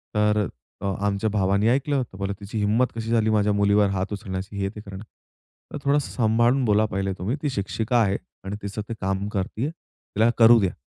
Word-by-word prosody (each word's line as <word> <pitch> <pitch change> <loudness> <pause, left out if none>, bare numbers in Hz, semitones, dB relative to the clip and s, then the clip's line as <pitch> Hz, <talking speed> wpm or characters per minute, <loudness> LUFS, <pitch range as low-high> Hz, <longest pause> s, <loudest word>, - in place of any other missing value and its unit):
तर 105 -1 +2 0.3
अ, - - -4 0.2
आमच्या 100 +2 0
भावाने 100 0 +2
ऐकलं. 135 +2 +1
तर 120 - -15
ते - - -10
बोलले, 100 0 -2
"तिची 105 +2 -6
हिंमत 110 +4 +2
कशी 115 -1 -4
झाली, 110 -2 +3
माझ्या 105 -1 +2
मुलीवर 100 0 +3
हात 95 +3 -2
उचलण्याची 95 0 -5
हे 95 0 -1
ते 105 - -9
करणं." 100 -2 -9
तर - - -18 0.7
म्हंटलं, 145 -2 -7
"थोडंसं 145 0 +1
सांभाळून 120 +3 +2
बोला 105 0 +3
पहिले 95 0 -1
तुम्ही, 105 +8 -1
ती 145 - +1
शिक्षिका 110 +1 -1
आहे 100 -2 +2 0.3
आणि 100 +1 -3
तिचं 100 +1 -4
ते - - -2
काम 95 +1 -1
करतीय, 105 +6 -2
तिला 115 -8 -2
करू 115 0 +8
द्या." 95 -4 0
105 Hz, 205 wpm, -24 LUFS, 100-115 Hz, 0.7 s, करू